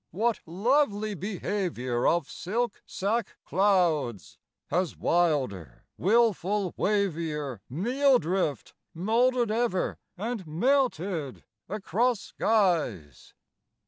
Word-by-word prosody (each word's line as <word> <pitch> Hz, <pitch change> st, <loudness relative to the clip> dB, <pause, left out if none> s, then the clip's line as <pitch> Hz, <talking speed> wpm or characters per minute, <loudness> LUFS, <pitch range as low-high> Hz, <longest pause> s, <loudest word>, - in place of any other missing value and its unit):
what 225 Hz, +6 st, 0 dB
lovely 215 Hz, -, +1 dB
behaviour 180 Hz, -, -2 dB
Of 170 Hz, -4 st, +2 dB
silk 230 Hz, +4 st, -3 dB
sack 215 Hz, +4 st, -2 dB
clouds! 155 Hz, -, +1 dB, 0.3 s
has 175 Hz, +1 st, 0 dB
wilder, 135 Hz, -, 0 dB
wilful 205 Hz, -2 st, +2 dB
wavier 160 Hz, -, -1 dB
Meal 250 Hz, -, +3 dB
drift 170 Hz, -, -2 dB, 0.2 s
moulded 235 Hz, +5 st, +2 dB
ever 225 Hz, -4 st, 0 dB, 0.2 s
and 215 Hz, -2 st, -4 dB
melted 180 Hz, -, 0 dB, 0.3 s
across 215 Hz, +3 st, 0 dB
skies? 165 Hz, -, 0 dB
190 Hz, 80 wpm, -28 LUFS, 155-225 Hz, 0.3 s, Meal